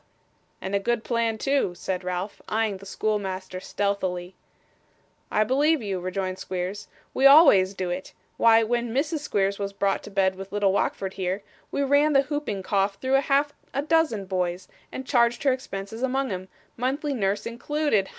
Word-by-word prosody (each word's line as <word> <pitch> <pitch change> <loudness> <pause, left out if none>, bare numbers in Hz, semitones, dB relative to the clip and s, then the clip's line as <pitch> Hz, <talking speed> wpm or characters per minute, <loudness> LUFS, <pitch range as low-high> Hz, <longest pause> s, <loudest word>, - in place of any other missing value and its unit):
'And 190 - -5
a 200 - +3
good 235 +2 -1
plan 230 -2 0
too,' 270 -7 0
said 185 +1 -3
Ralph, 180 +2 -4
eyeing 215 -2 0
the 195 +1 -12
schoolmaster 190 -3 -2
stealthily. 185 -2 -2 1.0
'I 215 - +3
believe 285 +4 +2
you,' 195 -3 -2
rejoined 185 +1 -3
Squeers. 190 +2 -4 0.3
'We 270 - +6
always 205 - +7
do 185 -2 -2
it. 180 +1 -5 0.3
Why, 225 0 +6
when 240 +1 -1
Mrs 300 +3 0
Squeers 200 -8 0
was 200 0 -3
brought 195 0 0
to - - -10
bed 195 -1 +2
with 195 0 -8
little 200 -1 +2
Wackford 195 -1 -1
here, 190 +1 -2 0.3
we 280 - -1
ran 285 +2 +3
the 275 0 +5
hooping 275 -9 -3
cough 195 0 +1
through 260 +6 -2
half 285 +1 +1 0.2
a 280 - 0
dozen 305 -10 +1
boys, 185 -1 -2 0.2
and 260 - -6
charged 240 -2 +2
her 275 -2 +4
expenses 220 -3 -6
among 265 -1 0
'em, 185 0 -5 0.3
monthly 275 +4 -1
nurse 200 -4 -1
included. 235 -3 0
205 Hz, 170 wpm, -25 LUFS, 190-265 Hz, 1.0 s, always